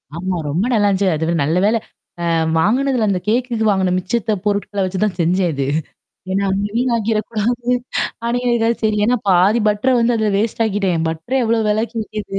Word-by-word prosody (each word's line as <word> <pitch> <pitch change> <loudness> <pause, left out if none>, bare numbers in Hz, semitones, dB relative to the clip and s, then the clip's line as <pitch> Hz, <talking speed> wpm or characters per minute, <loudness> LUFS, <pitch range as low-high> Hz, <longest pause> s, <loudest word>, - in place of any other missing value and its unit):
ஆமா. 185 +2 -2
ரொம்ப 175 +9 0
நல்லாந்துச்சு. 200 -3 +2
அதுவே 160 +2 -1
நல்ல 160 +5 0
வேள 220 +2 +3 0.5
அ - - -1 0.3
வாங்குனதுல 245 +5 +2
அந்த 185 -2 0
கேக்குக்கு 235 -1 0
வாங்குன 190 -3 +2
மிச்சத்த 215 +4 -1
பொருட்கள 205 0 -1
வச்சு 185 0 -3
தான் 200 -4 -2
செஞ்சேன் 175 +2 +2
இது. 135 -1 -2 0.6
ஏன்னா 195 +1 0 0.3
வீன் 245 +1 +1
ஆக்கிடக்கூடாது. 225 +2 -1 0.6
அடிங்கதுக்காவது 235 -1 +1
சரி. 215 -1 +2
ஏன்னா 250 - +3
பாதி 190 +6 +4
பட்டர 210 +5 +1
வந்து 235 +1 +2
அதல 215 -1 +1
வேஸ்ட் 225 +1 -1
ஆக்கிட்டேன். 195 -6 0
பட்டர 160 +10 -4
எவ்வளோ 225 0 +1
வெளக்கு 225 +2 -1
விக்கது? 210 -2 -5
210 Hz, 160 wpm, -18 LUFS, 185-230 Hz, 0.6 s, பாதி